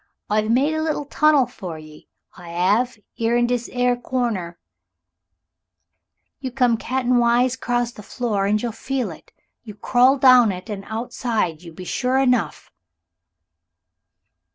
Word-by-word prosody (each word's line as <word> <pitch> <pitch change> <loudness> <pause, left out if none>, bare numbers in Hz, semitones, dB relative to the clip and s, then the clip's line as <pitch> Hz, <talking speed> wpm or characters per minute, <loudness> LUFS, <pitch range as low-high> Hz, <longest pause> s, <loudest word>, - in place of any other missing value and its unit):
"I've 215 +1 +1
made 270 +7 +2
a 315 - -1
liddle 310 -2 -2
tunnel 295 -2 +3
for 175 -7 -8
'e 155 -1 -14 0.3
so - - -14
I 170 -1 -10 0.3
'ave 245 -4 -5 0.2
'ere 230 +1 +1
in 240 - +3
dis 240 -1 -2
'ere 245 0 +1
corner 235 -9 -3 1.8
you 260 -1 -4
come 245 -2 +2
caten 250 +1 0
wise 240 +2 +3
crose 240 -2 -2
the 210 - -11
floor 210 -3 -2
and 210 +1 +2
you'll 235 +1 -3
feel 245 -1 -3
it. 160 - -14 0.3
You 215 -4 -10
crawl 255 +5 +3
down 255 -4 +6
it, 185 +4 -7
and 195 -1 -6
outside 220 -6 -2
you 170 -2 -11
be 180 +3 -10
sure 250 +7 0
enough." 250 - 0
240 Hz, 150 wpm, -21 LUFS, 210-255 Hz, 1.8 s, down